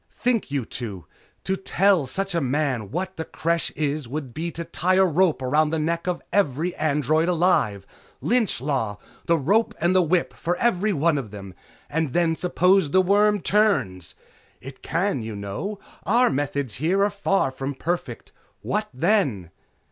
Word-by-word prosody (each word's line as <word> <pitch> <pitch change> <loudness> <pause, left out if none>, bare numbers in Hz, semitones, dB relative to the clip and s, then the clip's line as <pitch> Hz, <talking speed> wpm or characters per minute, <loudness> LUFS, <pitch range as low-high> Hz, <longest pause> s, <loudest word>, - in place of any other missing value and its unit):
Think, 240 -7 0
you 140 -4 -2
two! 105 -8 -7 0.4
To 190 - 0
tell 190 -4 +2
such 195 +8 -3
a 170 - +1
man 130 -6 -1
what 185 +4 -4
the 160 - -2
Creche 170 0 -1
is 150 -2 -2
would 135 -1 -5
be 165 +5 -3
to 170 0 -6
tie 175 +2 0
a 190 0 +5
rope 170 -4 +2
around 150 +4 +2
the 160 - -1
neck 165 +3 -1
of 180 -1 -2
every 170 -2 +1
android 155 +2 +1
alive. 160 - +1 0.3
Lynch 235 - +1
law! 125 -7 -2 0.3
The 170 - +4
rope 200 +11 +1
and 175 +2 +2
the 185 - +6
whip 175 +1 +1
for 175 +1 -2
every 215 -1 +1
one 155 -3 +2
of 120 -6 -7
them. 100 -2 -9 0.3
And 155 -3 -2
then 170 -2 +2
suppose 180 0 +2
the 185 - +4
worm 205 +1 +3
turns? 125 - +1 0.4
It 135 +1 -11
can, 170 -4 -1
you 110 -1 -6
know! 100 - -5 0.3
Our 250 +1 +3
methods 140 -3 -2
here 185 +5 +2
are 205 - +2
far 195 -7 0
from 135 +1 -5
perfect. 175 +6 -4 0.3
What 215 0 -1
then?" 135 - 0
165 Hz, 170 wpm, -24 LUFS, 135-190 Hz, 0.4 s, the